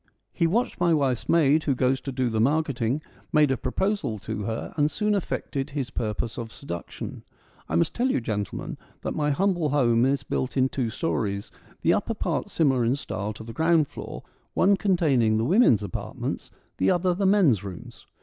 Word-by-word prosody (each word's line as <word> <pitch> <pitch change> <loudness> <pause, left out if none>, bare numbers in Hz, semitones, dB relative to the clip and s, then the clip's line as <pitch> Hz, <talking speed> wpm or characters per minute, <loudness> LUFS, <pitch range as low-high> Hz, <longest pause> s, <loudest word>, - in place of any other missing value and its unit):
He 170 - +2
watched 230 +9 0
my 175 -2 +4
wife's 135 -5 0
maid 155 -2 +4
who 140 - +2
goes 130 0 +1
to 135 - -5
do 125 -2 0
the 110 -1 +1
mark 155 +6 +3
eting, 130 +1 -1 0.3
made 150 -2 +4
a - - +3
proposal 135 - -1
to 105 +1 -5
her, 110 +1 -4
and 150 -1 +2
soon 210 +5 0
effected 145 -7 -2
his 140 -3 -4
purpose 110 +1 -3
of 115 -1 -6
seduction. 85 -12 -7 0.5
I 80 - -1
must 85 - +2
tell 250 +2 +1
you, - - +2
gentlemen, 105 -4 -4 0.2
that - - -2
my 150 -1 0
humble 175 0 +1
home 120 -5 +3
is 140 +1 0
built 130 +1 -2
in 130 0 +3
two 125 -4 -1
storeys, 105 -7 -2 0.3
the - - +4
upper - - -1
part - - -2
similar 135 -6 +2
in 120 +3 +2
style 105 -7 -4
to 110 - -10
the 115 +1 -8
ground 160 -1 +3
floor, - - -8 0.3
one 200 +2 +5
containing 150 - +2
the 110 - +1
women's 165 - +4
apartments, 100 - -4 0.3
the 95 - +2
other 180 +1 +2
the 195 +2 +1
men's 170 - +4
rooms. 95 -3 -9
135 Hz, 190 wpm, -26 LUFS, 115-165 Hz, 0.5 s, one